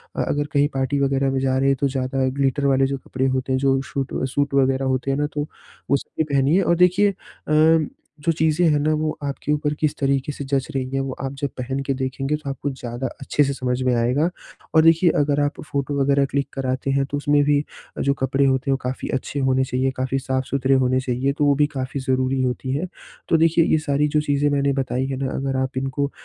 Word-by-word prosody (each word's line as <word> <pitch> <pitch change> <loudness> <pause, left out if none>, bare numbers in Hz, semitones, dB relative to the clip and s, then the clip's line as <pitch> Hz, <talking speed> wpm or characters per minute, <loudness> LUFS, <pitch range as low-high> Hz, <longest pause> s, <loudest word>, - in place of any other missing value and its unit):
अ, - - 0
अगर 145 0 -1
कहीं 145 0 +4
पार्टी 135 +1 0
वगैरह 135 0 +1
में 135 - 0
जा 130 0 +1
रहें 135 +1 +2
है, 135 - +3
तो 140 +1 0
ज़्यादा 130 0 -1
ग्लिटर 140 +1 +1
वाले 135 -1 +3
जो 135 0 -2
कपड़े 130 0 -3
होते 130 0 -1
हैं, 130 - +1
जो 135 -1 +2
शूट 135 -1 -3 0.2
सूट 145 0 +1
वगैरह 135 0 +2
होते 135 +1 -2
हैं 135 - 0
ना, 145 0 0
तो 150 0 -2 0.4
वो 140 - +4
सब - - -11
भी 160 - +4
पहनिए। 140 +8 +3
और 170 - +2
देखिए 185 +3 +4 0.3
अ, 155 0 +4 0.4
जो 165 - +3
चीज़ें 160 +2 +2
हैं 150 -1 +2
ना 155 +2 +1
वो 155 0 0
आपके 140 +1 -3
ऊपर 150 0 0
किस 155 -2 0
तरीके 140 0 0
से 140 - -6
जँच 135 -1 -1
रही 130 -1 -1
है, 135 - +1
वो 135 -1 -2
आप 135 0 -3
जब 140 - 0
पहन 130 +2 -3
के 135 - -1
देखेंगे 135 +2 -2
तो 150 -2 -6
आपको 135 +1 -3
ज़्यादा 125 0 -5
अच्छे 145 +2 +1
से 140 0 0
समझ 125 -1 -2
में 125 - +2
आएगा। 125 +8 +2 0.5
और 160 - +7
देखिए, 165 +2 +5
अगर 145 0 +2
आप 145 +1 -2
फ़ोटो 140 0 -2
वगैरह 140 0 +3
क्लिक 140 0 0
कराते 130 0 -2
हैं, 135 0 +1
तो 145 +1 -3
उसमें 145 0 +2
भी 145 0 +3 0.4
अ, - - -2
जो 140 - +2
कपड़े 135 0 +1
होते 130 0 +1
हैं, 135 - +4
वो - - 0
काफ़ी 130 +1 -4
अच्छे 140 +2 -5
होने 130 -1 +2
चाहिए, 130 +1 0
काफ़ी 130 +1 -1
साफ-सुथरे 130 0 0
होने 130 +1 +2
चाहिए, 130 +1 -1
तो 145 0 0
वो 145 - +4
भी 145 - +5
काफ़ी 130 +1 -3
ज़रूरी 130 0 0
होती 130 +1 -2
है। 155 +7 -1 0.4
तो 165 - +4
देखिए, 165 0 +4
ये - - +3
सारी 145 +1 +2
जो 150 - +3
चीज़ें 145 0 +1
मैंने 140 -1 +1
बताई 130 0 -2
है 135 - -3
ना, 130 - -1
अगर 135 0 -2
आप 130 0 -2
इनको 135 +1 -1
135 Hz, 240 wpm, -22 LUFS, 130-145 Hz, 0.5 s, और